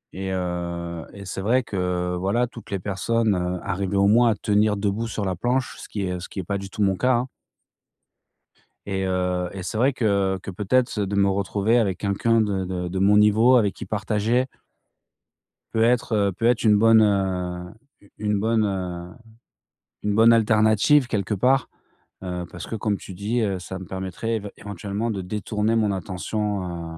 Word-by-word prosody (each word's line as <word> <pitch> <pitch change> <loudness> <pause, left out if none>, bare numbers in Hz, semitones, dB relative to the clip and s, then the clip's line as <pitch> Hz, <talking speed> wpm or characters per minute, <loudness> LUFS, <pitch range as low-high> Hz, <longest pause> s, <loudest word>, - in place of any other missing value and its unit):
Et 95 0 -4
heu, 85 -2 -4
et 100 -1 -10
c'est 95 - -5
vrai 125 +6 +2
que, 110 - -8
heu, 90 -1 -1
voilà, 100 +7 +1
toutes 115 -2 -12
les 100 - -1
personnes, 105 +4 0
heu, 90 0 -2
arrivaient 100 +1 -2
au 100 - +4
moins 115 +3 +5
à 110 - +2
tenir 105 -1 +1
debout 100 +3 -1
sur 105 -2 -3
la 95 -1 -1
planche, 125 +7 -1
ce - - -10
qui 100 -2 -3
est 90 -1 -2
ce 90 - -8
qui - - -6
est 95 - -3
pas 100 +2 -2
du 100 - -8
tout 105 - -2
mon 95 -1 +2
cas, 125 +6 +2
hein. 120 +2 -1 1.6
Et 95 -1 -2
heu 90 -1 0
et 95 - -6
c'est 100 - -4
vrai 130 +4 +3
que 100 -5 +1
que, - - -5
peut-être, 110 +5 0
de 100 0 -1
me 100 -1 +3
retrouver 100 +4 +1
avec 100 -6 +1
quelqu'un 110 +3 +2
de 100 -3 -1
de 90 -1 -3
de 95 +1 -3
mon 100 +2 +4
niveau 110 +4 +5
avec 105 -5 +3
qui - - -8
partager 110 +3 0 1.3
peut 110 - +1
être, 120 0 +2
heu, 100 -2 +2
peut 105 +6 -3
être 120 -1 +3
une 105 -2 +5
bonne, 115 +1 +6
heu, 90 -3 0 0.3
u 100 - -21
une 105 -1 0
bonne, 110 +1 +2
heu, 90 -3 -3 0.9
une 105 -1 0
bonne 115 +2 +6
alternative 110 +4 +4
quelque 105 -3 -1
part. 130 +6 +2 0.6
Heu, 90 -1 -3
parce 85 - -8
que, - - -4
comme 105 -2 -1
tu 95 - -10
dis, 105 +6 -2
heu, 100 -3 0
ça 95 +1 -7
me 95 - -8
permettrait 95 +5 -4
év 100 -2 -4
éventuellement 105 +3 -4
de 100 - -3
détourner 105 +3 -1
mon 105 -3 +1
attention, 90 -3 -4
100 Hz, 195 wpm, -24 LUFS, 95-110 Hz, 1.6 s, bonne